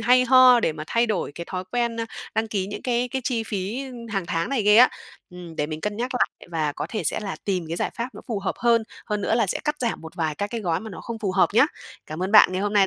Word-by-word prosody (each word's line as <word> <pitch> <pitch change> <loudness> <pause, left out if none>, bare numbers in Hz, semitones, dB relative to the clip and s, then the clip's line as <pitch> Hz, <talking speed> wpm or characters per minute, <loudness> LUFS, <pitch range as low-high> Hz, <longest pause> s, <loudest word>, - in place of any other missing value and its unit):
hay 250 +2 +5
ho 255 -1 +7
để 160 - +1
mà 155 0 -7
thay 235 +1 +2
đổi 195 -9 -2
cái 170 - -6
thói 185 -1 -4
quen, 235 -1 0
a, 230 - -2 0.3
đăng 220 0 0
ký 195 -3 -1
những 205 - -7
cái 245 0 0
cái 265 +1 -3
chi 235 -4 0
phí 210 +6 -3 0.3
hàng 195 -4 -2
tháng 165 +1 -1
này 265 -6 0
ghê 210 +1 +5
á. 250 +2 +9 0.4
Ừm, 175 -2 -10
để 150 - 0
mình 155 0 -5
cân 210 +2 -3
nhắc 245 +2 -2
lại 250 - -1
và 155 -3 -1
có - - -4
thể 215 - -3
sẽ - - 0
là 195 -2 -4
tìm 185 -4 -1
cái 165 - -3
giải - - -1
pháp 235 +2 -2
nó - - -9
phù 220 - -1
hợp 195 - -2
hơn, 235 -1 +3 0.2
hơn 210 -2 -1
nữa 220 - +1
là 230 -3 +2
sẽ - - -1
cắt 300 0 0
giảm 235 -2 -1
một 160 +2 -10
vài 160 -4 -1
các 205 - -2
cái 230 -2 -3
gói 170 -5 0
mà 220 0 -8
nó - - -8
không 230 -1 -6
phù 200 -4 -2
hợp 190 - +4
nhá. 260 +6 +6 0.4
Cảm 155 +4 -5
ơn 190 +3 -2
bạn 210 -3 +8
ngày 185 +2 -1
hôm 205 0 -1
nay 200 -2 +5
210 Hz, 300 wpm, -24 LUFS, 180-235 Hz, 0.4 s, á